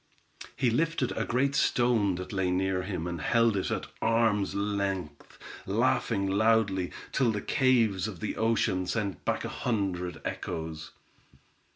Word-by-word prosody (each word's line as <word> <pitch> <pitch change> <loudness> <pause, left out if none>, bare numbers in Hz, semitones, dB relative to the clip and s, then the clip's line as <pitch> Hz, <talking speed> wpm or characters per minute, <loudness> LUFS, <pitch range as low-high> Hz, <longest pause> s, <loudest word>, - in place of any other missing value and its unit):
He 125 -3 +1
lifted 155 0 0
a 110 - -1
great 135 +3 +1
stone 120 -7 +2
that 90 +2 -6
lay 95 -2 0
near 95 +1 0
him, 90 -3 -4
and 85 -2 -4
held 115 +1 +3
it 95 - -1
at - - -2 0.2
arms' 115 -3 +2
length, 100 -6 -3 0.3
laughing 100 +9 +1
loudly, 100 -2 +2 0.2
till 125 -4 +2
the 105 - -2
caves 115 -7 +2
of 100 -6 -7
the 105 - -3
ocean 110 -5 +1
sent 100 -3 -2
back - - -1
a - - -3
hundred 90 -7 -2
echoes. 80 -1 -5
100 Hz, 145 wpm, -29 LUFS, 90-115 Hz, 0.3 s, held